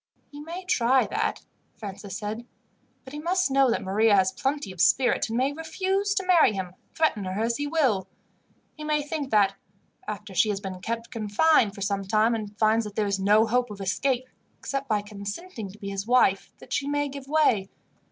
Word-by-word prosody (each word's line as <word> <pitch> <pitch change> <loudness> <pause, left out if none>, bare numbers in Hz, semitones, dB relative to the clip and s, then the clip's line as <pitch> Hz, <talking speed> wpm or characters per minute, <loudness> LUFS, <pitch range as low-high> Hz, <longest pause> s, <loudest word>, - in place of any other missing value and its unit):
"He 290 - -10
may 340 +5 -7
try 255 -6 +3
that," 435 - -2 0.3
Francis 200 -1 -7
said; 220 +3 -5 0.6
"but 260 - -12
he 295 - -5
must 355 0 +1
know 270 -1 +4
that 230 - 0
Maria 205 +3 +3
has 190 -1 +3
plenty 270 0 -2
of 180 -2 -4
spirit, 245 +5 +3
and 225 - -2
may 265 +3 +1
refuse 380 +6 -1
to 385 -2 -1
marry 345 -11 +5
him, 185 -2 -5 0.2
threaten 305 - +1
her 185 +2 -3
as 235 +1 0
he 290 - -2
will. 260 - +1 0.7
He 305 - -9
may 300 -1 0
think 295 -2 -4
that, 205 -3 +4 0.5
after - - -6
she 215 - +3
has 200 -2 -1
been 190 -2 -7
kept 230 +3 -4
confined 220 +1 +2
for 200 - -9
some 200 0 -1
time, 215 +4 +2
and 210 -2 -5
finds 220 +1 +3
that 205 -1 -8
there 215 - +1
is 200 -1 -1
no 210 +3 +4
hope 245 +2 +1
of 205 -1 -9
escape, 250 +6 -1 0.3
except 275 -1 -4
by 210 -2 +1
consenting 205 - -7
to 195 - -13
be 200 -2 -6
his 195 +1 -4
wife, 240 -6 +3 0.2
she 275 +2 -1
may 290 0 0
give 275 -1 -8
way. 265 -10 +2
230 Hz, 200 wpm, -26 LUFS, 200-290 Hz, 0.7 s, marry